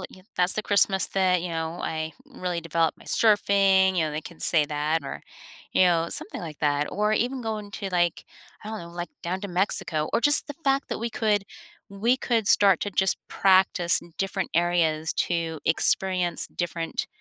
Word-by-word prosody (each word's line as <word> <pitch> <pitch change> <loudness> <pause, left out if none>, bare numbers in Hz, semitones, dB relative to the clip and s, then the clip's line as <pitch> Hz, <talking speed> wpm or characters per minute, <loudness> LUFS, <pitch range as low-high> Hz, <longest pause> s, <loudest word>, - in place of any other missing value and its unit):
l - - -7 0.3
"That's 180 +1 +3
the 215 - -1
Christmas 200 -2 +3
that, 185 -2 +2
you 180 - -3
know, 165 +1 -4
I 160 0 -3
really 180 -11 -4
developed 165 0 0
my - - -16
surfing." 195 -3 +3
You 160 - +2
know, 155 - -3
they 150 - -3
can 165 +1 -12
say 155 -3 +3
that 150 +2 -1
or, - - -6 0.5
you - - +4
know, 170 -2 +2
something - - -6
like 160 -4 -8
that, 145 0 +1
or 210 +1 0
even 250 +4 0
going 215 -3 -4
to, 200 -2 -5
like, 175 -2 0 0.4
I - - -6
don't 220 0 -4
know, 170 - -10
like, 175 0 -6
down 180 +2 -3
to 200 - -4
Mexico 175 -4 -1
or - - +2
just 290 +5 +4
the 290 - -5
fact 275 0 +1
that - - -3
we 235 +2 -2
could 210 -3 +1 0.4
we 225 +6 +1
could 230 -5 0
start 195 -4 +5
to 205 - -2
just 190 0 +1
practice 185 -2 +3 0.2
different 195 0 -2
areas 160 -2 +1
to 165 -3 -2
experience 180 +1 0
different, 170 -1 -3
180 Hz, 190 wpm, -25 LUFS, 165-205 Hz, 0.5 s, start